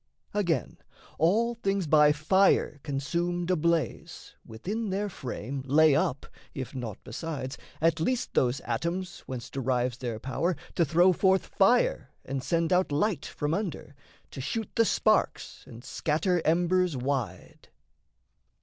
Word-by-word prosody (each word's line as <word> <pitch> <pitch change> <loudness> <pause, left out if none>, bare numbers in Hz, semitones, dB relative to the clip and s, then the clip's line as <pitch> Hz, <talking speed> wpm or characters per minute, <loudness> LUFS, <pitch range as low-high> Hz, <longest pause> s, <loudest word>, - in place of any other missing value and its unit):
Again, 175 - -1 0.4
all 220 +9 +3
things 195 -5 -1
by 150 -1 +5
fire 155 0 +2
consumed 170 +6 -2
ablaze, 170 - -1
Within 200 - -4
their 200 +2 -1
frame 135 - -5
lay 155 +2 +5
up, 140 -2 0 0.3
if 130 -2 -5
naught 120 -6 -5
besides, 145 -5 -5 0.2
At 165 +1 +2
least 245 +9 -1
those 125 +1 +1
atoms 175 +3 -3
whence 125 -2 -6
derives 125 -1 -1
their 120 -4 -3
power 165 +9 -1 0.2
To 170 - +2
throw 175 +5 +4
forth 190 +1 +2
fire 195 - +2 0.2
and 135 -1 -3
send 170 +3 +1
out 180 -3 +2
light 160 +2 0
from 150 +1 -2
under, 175 -7 -4 0.4
To 135 - -6
shoot 220 - -3
the 230 - +3
sparks 215 0 +1
and 120 -1 -11
scatter 165 +5 0
embers 175 -1 +2
wide. 125 -8 -4
160 Hz, 130 wpm, -28 LUFS, 135-185 Hz, 0.4 s, by